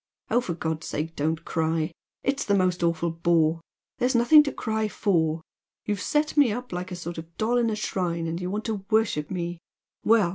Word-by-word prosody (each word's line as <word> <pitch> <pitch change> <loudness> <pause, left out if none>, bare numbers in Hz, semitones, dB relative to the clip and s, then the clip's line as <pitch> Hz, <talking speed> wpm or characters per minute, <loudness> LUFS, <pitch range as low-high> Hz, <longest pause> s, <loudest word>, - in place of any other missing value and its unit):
Oh, 245 - +4
for 175 -8 -3
God's 160 -1 -3
sake 160 +2 -3
don't 160 +3 -1
cry! 160 -1 0 0.3
It's 275 +1 0
the 200 - +2
most 180 -2 +1
awful 170 0 +1
bore! 165 -1 +2 0.4
There's 250 +1 +2
nothing 240 +6 +8
to 280 - -1
cry 220 0 -1
for. 165 -7 +1 0.4
You've 205 -1 -1
set 300 0 +1
me 285 -6 +5
up 245 -1 -5
like 180 +1 -4
a - - -3
sort 170 -1 -6
of 165 +1 -12
doll 235 +3 +1
in 235 -1 +2
a 215 - -1
shrine 175 -5 -2
and 165 +2 -3
you 180 - -2
want 210 +3 -3
to 215 -4 -2
worship 215 -9 +1
me 175 -2 -3 0.4
well! 220 -5 +4
180 Hz, 205 wpm, -26 LUFS, 165-220 Hz, 0.4 s, nothing